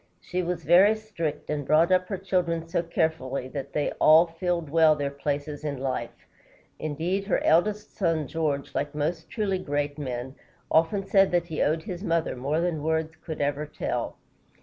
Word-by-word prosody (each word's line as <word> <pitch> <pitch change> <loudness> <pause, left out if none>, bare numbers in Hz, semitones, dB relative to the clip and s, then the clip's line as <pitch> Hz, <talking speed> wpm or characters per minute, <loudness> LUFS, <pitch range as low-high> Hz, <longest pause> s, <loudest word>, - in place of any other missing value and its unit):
She 180 0 -3
was 175 -1 -3
very 185 +7 +6
strict, 170 -11 -4
and 150 -1 -1
brought 160 +5 +4
up 185 0 +3
her 195 - -3
children 175 -3 -1
so 170 +1 0
carefully 160 -6 -1
that 140 0 -6
they 150 - 0
all 160 +2 +8
filled 170 -2 -2
well 160 -1 +5
their 140 -1 -2
places 145 +1 -3
in 145 -2 -3
life. 130 -3 -4 0.5
Indeed, 170 +6 -2
her 195 - +1
eldest 205 +6 +2
son, 165 -5 +1
George, 150 -3 -2
like 145 +1 -2
most 160 +3 -2
truly 200 -4 -1
great 145 -2 -2
men, 130 -2 -4 0.4
often 165 +5 +2
said 195 -1 +4
that 175 -1 +2
he 160 -3 -3
owed 160 +2 +1
his 185 -3 -6
mother 165 -7 0
more 140 +6 -1
than 170 -3 -1
words 160 +1 -1
could 160 -3 -5
ever 145 +1 -1
tell. 150 - -3
160 Hz, 175 wpm, -26 LUFS, 145-175 Hz, 0.5 s, all